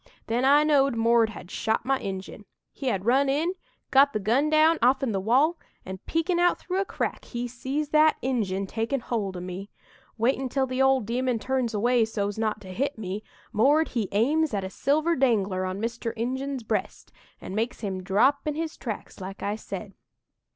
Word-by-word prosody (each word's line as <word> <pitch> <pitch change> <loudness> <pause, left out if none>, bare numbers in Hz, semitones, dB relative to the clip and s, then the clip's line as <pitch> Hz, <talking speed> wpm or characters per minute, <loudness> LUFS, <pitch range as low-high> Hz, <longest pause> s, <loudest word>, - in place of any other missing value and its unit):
Then 235 +3 0
I 290 +2 +6
knowed 275 -4 +3
'Mord' 230 0 +3
had 185 -4 -10
shot 220 +1 -1
my 270 0 +1
Injun. 195 +2 -6 0.3
He 270 - -6
had 195 -5 -1
run 270 +4 +3
in, 315 +6 +1 0.4
got 275 +1 +5
the 215 - 0
gun 240 +9 +2
down 310 +1 +4
off'n 260 +1 +3
the 195 - -1
wall, 265 - +2 0.3
an' 190 0 -6
peekin' 340 +2 0
out 350 0 +3
through 370 +1 -2
a - - -1
crack, - - -3
he 245 0 -4
sees 265 +5 -3
that 310 0 +5
Injun 205 -7 -1
takin' 225 +7 -2
hold 205 -6 -3
o' - - -6
me. 185 +3 -6 0.5
Waitin' 260 +3 +1
till 265 +1 +1
the 255 0 -2
ol' 265 0 +4
demon 245 +3 -1
turns 250 -1 -1
away, 240 +3 +3
so's 205 -1 -3
not 215 -1 -1
to 190 - -11
hit 275 +9 -2
me, 205 0 -5 0.3
'Mord' 285 +9 +4
he 220 -6 -2
aims 280 +6 +2
at 195 - -1
a 190 - -5
silver 310 +8 +1
dangler 205 - +1
on 185 +1 -3
Mr. 230 +1 -3
Injun's 260 +3 -3
breast 215 -3 -3 0.3
and 190 - -7
makes 225 +3 -2
him 190 -3 -3
drop 215 +11 +2
in 300 - -1
his 320 0 -4
tracks 220 -3 -6
like 195 +2 -7
I 205 +1 -1
said. 220 - -7
240 Hz, 195 wpm, -26 LUFS, 210-275 Hz, 0.5 s, I